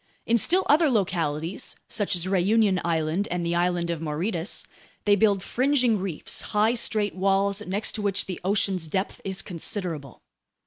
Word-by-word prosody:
In 230 Hz, -, +2 dB
still 355 Hz, -, +4 dB
other 305 Hz, +1 st, +4 dB
localities, 170 Hz, -, -1 dB
such 205 Hz, -3 st, -1 dB
as 175 Hz, 0 st, -3 dB
Réunion 195 Hz, +1 st, +2 dB
Island 165 Hz, +3 st, 0 dB
and 175 Hz, -1 st, -2 dB
the 170 Hz, -, 0 dB
island 175 Hz, 0 st, 0 dB
of 165 Hz, -2 st, -4 dB
Mauritius, 165 Hz, +4 st, -3 dB, 0.4 s
they 205 Hz, -1 st, +5 dB
build 200 Hz, -2 st, +2 dB
fringing 255 Hz, -4 st, +2 dB
reefs, 185 Hz, -5 st, -2 dB, 0.2 s
high, 220 Hz, +3 st, +4 dB
straight 215 Hz, -4 st, +1 dB
walls 195 Hz, +1 st, +1 dB
next 200 Hz, +4 st, 0 dB
to 215 Hz, -, -4 dB
which 200 Hz, -1 st, +1 dB
the 185 Hz, -, -6 dB
ocean's 190 Hz, -3 st, 0 dB
depth 190 Hz, +5 st, -3 dB
is 190 Hz, -1 st, -2 dB
considerable. 165 Hz, -, -4 dB
195 Hz, 160 wpm, -25 LUFS, 170-210 Hz, 0.4 s, they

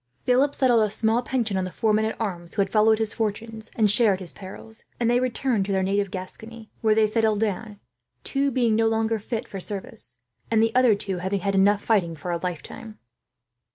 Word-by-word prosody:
Philip 270 Hz, +3 st, +2 dB
settled 245 Hz, -4 st, +3 dB
a 215 Hz, -, +2 dB
small 220 Hz, +3 st, +1 dB
pension 235 Hz, -6 st, -1 dB
on 190 Hz, -, 0 dB
the 185 Hz, -, -3 dB
four 220 Hz, +3 st, 0 dB
men 215 Hz, +1 st, +2 dB
at 220 Hz, -, -4 dB
arms 175 Hz, -6 st, -4 dB
who 205 Hz, -, +2 dB
had 195 Hz, -, -7 dB
followed 220 Hz, 0 st, +4 dB
his 220 Hz, -1 st, +1 dB
fortunes 220 Hz, +1 st, -4 dB
and 220 Hz, -2 st, +3 dB
shared 205 Hz, -2 st, +3 dB
his 180 Hz, -3 st, -4 dB
perils, 205 Hz, +3 st, -9 dB, 0.2 s
and 235 Hz, -, +1 dB
they 240 Hz, +1 st, +3 dB
returned 250 Hz, -3 st, 0 dB
to -, -, -2 dB
their 190 Hz, -1 st, +1 dB
native 200 Hz, +1 st, 0 dB
Gascony; 220 Hz, +5 st, -8 dB
where 220 Hz, -1 st, +3 dB
they 220 Hz, 0 st, +4 dB
settled 215 Hz, -1 st, +1 dB
down, 210 Hz, 0 st, -3 dB, 0.4 s
two 280 Hz, 0 st, 0 dB
being 240 Hz, -4 st, +1 dB
no 225 Hz, 0 st, +3 dB
longer 225 Hz, 0 st, 0 dB
fit 225 Hz, +2 st, -4 dB
for 195 Hz, -, -7 dB
service, 195 Hz, -, -7 dB, 0.3 s
and 225 Hz, -, +2 dB
the 225 Hz, 0 st, +1 dB
others 245 Hz, -5 st, +3 dB
having 190 Hz, 0 st, -2 dB
had 195 Hz, +2 st, -1 dB
enough 200 Hz, +1 st, +3 dB
fighting 185 Hz, -7 st, +1 dB
for 170 Hz, +4 st, -5 dB
a 170 Hz, -, -1 dB
lifetime. 180 Hz, +5 st, -6 dB
215 Hz, 210 wpm, -24 LUFS, 195-225 Hz, 0.4 s, followed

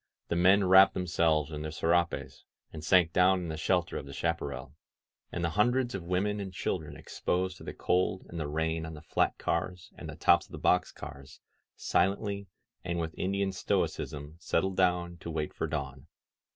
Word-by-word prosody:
The -, -, 0 dB
men 95 Hz, +3 st, +5 dB
wrapped 95 Hz, +1 st, +7 dB
themselves 80 Hz, -4 st, +1 dB
in 75 Hz, -1 st, -5 dB
their 75 Hz, -, -4 dB
serapes 85 Hz, +2 st, 0 dB, 0.3 s
and 75 Hz, -, -7 dB
sank 85 Hz, -1 st, +4 dB
down 95 Hz, 0 st, +4 dB
in 85 Hz, -, -5 dB
the 80 Hz, -, -3 dB
shelter 90 Hz, +2 st, 0 dB
of 70 Hz, -, -6 dB
the 70 Hz, -, -8 dB
chaparral; 70 Hz, -4 st, -3 dB, 0.6 s
and 90 Hz, -, -3 dB
the 85 Hz, -, -1 dB
hundreds 120 Hz, +6 st, +2 dB
of 100 Hz, -, -3 dB
women 95 Hz, +4 st, 0 dB
and 95 Hz, -2 st, -5 dB
chil 90 Hz, +1 st, -1 dB
dren 75 Hz, -, -10 dB
exposed 95 Hz, +1 st, -2 dB
to -, -, -12 dB
the -, -, -7 dB
cold 90 Hz, +1 st, 0 dB
and 85 Hz, -, -6 dB
the 75 Hz, -, -2 dB
rain 80 Hz, +2 st, -1 dB
on 80 Hz, -, -7 dB
the 75 Hz, -, -11 dB
flat -, -, +1 dB
cars 90 Hz, -1 st, -2 dB
and -, -, -8 dB
the -, -, -7 dB
tops -, -, +4 dB
of -, -, -19 dB
the -, -, -5 dB
box 90 Hz, -, +2 dB
cars 70 Hz, 0 st, -10 dB, 0.4 s
silently 100 Hz, +2 st, 0 dB, 0.4 s
and 85 Hz, -1 st, -2 dB
with 80 Hz, -1 st, -3 dB
Indian 100 Hz, +1 st, 0 dB
stoicism 75 Hz, -4 st, -2 dB
settled 95 Hz, +2 st, 0 dB
down 90 Hz, -2 st, +1 dB
to 85 Hz, -, -8 dB
wait 80 Hz, -2 st, -3 dB
for -, -, -2 dB
dawn. 70 Hz, -3 st, -5 dB
85 Hz, 190 wpm, -30 LUFS, 80-95 Hz, 0.6 s, wrapped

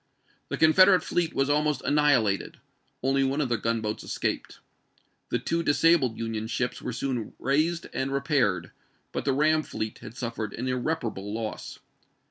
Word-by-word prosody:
The -, -, -2 dB
Confederate 185 Hz, +4 st, +6 dB
fleet 170 Hz, -2 st, -1 dB
was 135 Hz, -, +2 dB
almost 150 Hz, -1 st, +1 dB
annihilated; 140 Hz, -9 st, +2 dB, 0.5 s
only 135 Hz, +1 st, +2 dB
one 135 Hz, +2 st, 0 dB
of 140 Hz, -4 st, 0 dB
their 120 Hz, -2 st, 0 dB
gunboats 110 Hz, -1 st, -2 dB
escaped. -, -, -3 dB, 0.7 s
The -, -, +1 dB
two 165 Hz, +1 st, -1 dB
disabled 145 Hz, -5 st, +3 dB
Union 110 Hz, -1 st, -3 dB
ships 120 Hz, +1 st, -2 dB
were 125 Hz, -, -4 dB
soon 125 Hz, -2 st, -3 dB
raised 155 Hz, +6 st, +1 dB
and 135 Hz, +1 st, -2 dB
repaired, 130 Hz, -, +1 dB, 0.4 s
but -, -, -4 dB
the 140 Hz, -, +2 dB
ram 155 Hz, +3 st, +3 dB
fleet 110 Hz, -7 st, -5 dB
had 120 Hz, -, -11 dB
suffered 115 Hz, -3 st, -4 dB
an 125 Hz, +3 st, -4 dB
irreparable 125 Hz, -6 st, -2 dB
loss. 110 Hz, 0 st, -5 dB
130 Hz, 150 wpm, -27 LUFS, 115-150 Hz, 0.7 s, Confederate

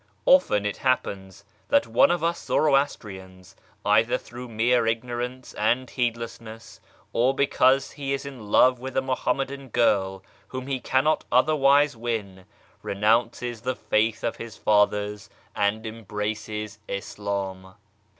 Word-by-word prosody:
Often 105 Hz, -, +4 dB
it 105 Hz, -, -2 dB
happens 100 Hz, -7 st, -2 dB, 0.2 s
that 285 Hz, 0 st, +3 dB
one 275 Hz, -, +4 dB
of 175 Hz, -2 st, 0 dB
us 170 Hz, +1 st, -1 dB
Zoroastrians, 95 Hz, -, -1 dB, 0.3 s
either 110 Hz, +4 st, +3 dB
through 125 Hz, +1 st, -10 dB
mere 115 Hz, +1 st, +2 dB
ignorance 120 Hz, +2 st, -3 dB
and 120 Hz, +4 st, +1 dB
heedlessness, 115 Hz, -2 st, -5 dB, 0.3 s
or 130 Hz, +3 st, +2 dB
because 135 Hz, -1 st, +3 dB
he 140 Hz, -1 st, -5 dB
is 140 Hz, 0 st, -2 dB
in 130 Hz, -7 st, -9 dB
love 125 Hz, +3 st, +5 dB
with 130 Hz, +1 st, -6 dB
a -, -, +4 dB
Muhammadan 135 Hz, +1 st, -2 dB
girl 95 Hz, -5 st, +1 dB, 0.2 s
whom 130 Hz, 0 st, -6 dB
he 135 Hz, -1 st, -2 dB
cannot 135 Hz, +5 st, +1 dB
otherwise 140 Hz, +1 st, +4 dB
win, 105 Hz, -5 st, -4 dB, 0.4 s
renounces 115 Hz, +3 st, 0 dB
the 130 Hz, +2 st, -2 dB
faith 110 Hz, +1 st, 0 dB
of -, -, -2 dB
his 115 Hz, -3 st, -8 dB
fathers 105 Hz, -1 st, +1 dB, 0.3 s
and 105 Hz, +2 st, 0 dB
embraces 105 Hz, -1 st, -5 dB
Islam. 100 Hz, -2 st, -5 dB
115 Hz, 125 wpm, -25 LUFS, 105-130 Hz, 0.4 s, love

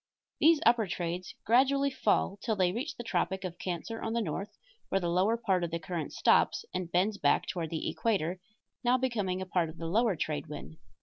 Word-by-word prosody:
These 320 Hz, 0 st, +5 dB
upper 230 Hz, -3 st, +4 dB
trades 175 Hz, 0 st, -4 dB
gradually 275 Hz, +4 st, +4 dB
fall 205 Hz, -4 st, +1 dB
till 220 Hz, -2 st, 0 dB
they 185 Hz, -3 st, +2 dB
reach 265 Hz, -, -4 dB
the 240 Hz, -, -5 dB
tropic 190 Hz, -2 st, -1 dB
of 180 Hz, -1 st, -6 dB
Cancer 185 Hz, +6 st, -4 dB
on 225 Hz, -, -2 dB
the 235 Hz, -, +1 dB
north, 205 Hz, 0 st, -4 dB, 0.3 s
where 195 Hz, -, +2 dB
the 175 Hz, -2 st, -1 dB
lower 195 Hz, +6 st, +2 dB
part 195 Hz, -6 st, +1 dB
of 170 Hz, -, -1 dB
the 170 Hz, -, -2 dB
current 165 Hz, -1 st, -4 dB
stops -, -, +3 dB
and 180 Hz, -2 st, -3 dB
bends 200 Hz, +4 st, +1 dB
back -, -, +3 dB
toward 165 Hz, -3 st, -3 dB
the 160 Hz, -1 st, -3 dB
equator, 190 Hz, -5 st, 0 dB, 0.4 s
now 245 Hz, +1 st, +4 dB
becoming 205 Hz, -8 st, -1 dB
a -, -, -7 dB
part 180 Hz, -3 st, 0 dB
of 160 Hz, -, -11 dB
the 165 Hz, -, -6 dB
lower 210 Hz, +4 st, +2 dB
trade 150 Hz, -1 st, -3 dB
wind. 150 Hz, +1 st, -8 dB
190 Hz, 205 wpm, -30 LUFS, 175-230 Hz, 0.4 s, These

